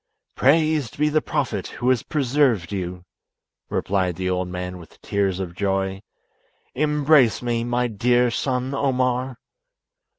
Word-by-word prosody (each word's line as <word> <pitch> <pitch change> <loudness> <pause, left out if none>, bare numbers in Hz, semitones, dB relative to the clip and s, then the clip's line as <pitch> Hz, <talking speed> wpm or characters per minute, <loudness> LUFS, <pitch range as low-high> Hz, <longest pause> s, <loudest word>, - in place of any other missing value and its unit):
"Praised 155 -1 +2
be 150 +1 +2
the 155 +1 +2
Prophet 110 -9 -2
who 125 +1 0
has 130 -3 +3
preserved 130 - +1
you! 90 -2 -4 0.6
replied 95 -3 0
the 95 +2 -2
old 90 0 -1
man 90 0 -5
with 85 - -15
tears 100 -2 0
of 90 -3 -4
joy. 95 0 -1 0.7
"Embrace 150 -4 +3
me, 120 -1 0
my 120 +1 0
dear 120 +2 +2
son 130 +2 -1
Omar!" 130 -2 0
120 Hz, 130 wpm, -23 LUFS, 95-135 Hz, 0.7 s, has